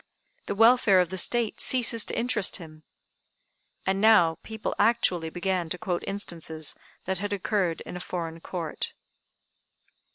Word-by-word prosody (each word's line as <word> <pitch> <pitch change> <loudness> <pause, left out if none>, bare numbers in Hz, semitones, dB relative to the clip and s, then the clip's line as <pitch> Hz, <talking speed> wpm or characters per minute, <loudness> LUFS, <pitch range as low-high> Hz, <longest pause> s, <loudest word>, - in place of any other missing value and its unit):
The - - -2
welfare 225 -3 +5
of 180 -2 +2
the 190 - -5
State 235 +3 +1
ceases 235 -3 +3
to - - -4
interest 230 -5 0
him." 155 -2 -9 1.0
And 195 +1 0
now 190 -7 +5
people 220 -1 -4
actually 205 -7 +2
began 175 0 -2
to 180 - -2
quote 180 -3 -3
instances 165 -6 -4 0.3
that 190 -1 -1
had 205 +1 -3
occurred 195 -3 -1
in - - -8
a - - -5
foreign 165 -2 -5
Court. 165 -2 -5
190 Hz, 140 wpm, -27 LUFS, 170-220 Hz, 1.0 s, welfare